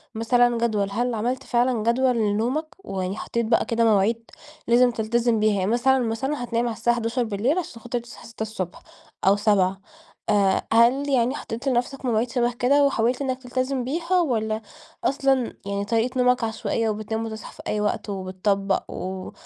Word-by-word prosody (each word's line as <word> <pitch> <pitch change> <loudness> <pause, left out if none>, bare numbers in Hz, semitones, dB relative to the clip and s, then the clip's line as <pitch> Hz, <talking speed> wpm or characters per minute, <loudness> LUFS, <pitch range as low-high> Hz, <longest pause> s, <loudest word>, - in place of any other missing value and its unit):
مثلًا 240 +1 +3
جدول، 215 -4 0
هل 240 +4 -1
عملت 245 +4 -2
فعلًا 240 -2 +1
جدول 245 +2 +2
لنومك؟ 225 +8 0 0.2
ويعني 190 - -3
حطيت 235 +1 -2
بقى 225 +1 +2
كده 230 0 +1
مواعيد 225 +1 +2 0.4
لازم 245 +1 +5
تلتزم 230 0 +1
بيها، 215 0 +3
يعني 190 +3 0
مثلًا، 265 +3 +3
مثلًا 245 +4 -2
هتنام 235 0 -1
على 230 - -3
الساعة 240 +1 +2
23:00 235 - 0
علشان 300 -10 -5
خاطر 240 +1 -3
تصحى 235 0 -13
06:00 220 -5 -5 0.5
أو 195 - +6
07:00 195 -2 +2 0.5
آآ، 200 -2 +2
هل 250 +5 +4
يعني 255 0 +2
حطيت 235 -1 -6
لنفسك 260 +1 -1
مواعيد 235 0 +1
شبه 240 -1 +1
كده، 270 +4 +3
وحاولت 245 -1 +1
إنك 260 -1 -2
تلتزم 255 +1 -2
بيها، 340 +7 0
والّا 220 -7 -1 0.4
أصلًا 270 -3 +1
يعني 200 0 -2
طريقة 235 +4 0
نومك 250 -1 +3
عشوائية، 225 0 -1
وبتنام 215 +1 -3
وتصحى 220 -1 -7
في - - -12
أي 210 - -1
وقت 210 +1 -1
وبِتَطَبق 195 +1 -1
و 185 0 -5
230 Hz, 165 wpm, -24 LUFS, 215-250 Hz, 0.5 s, أو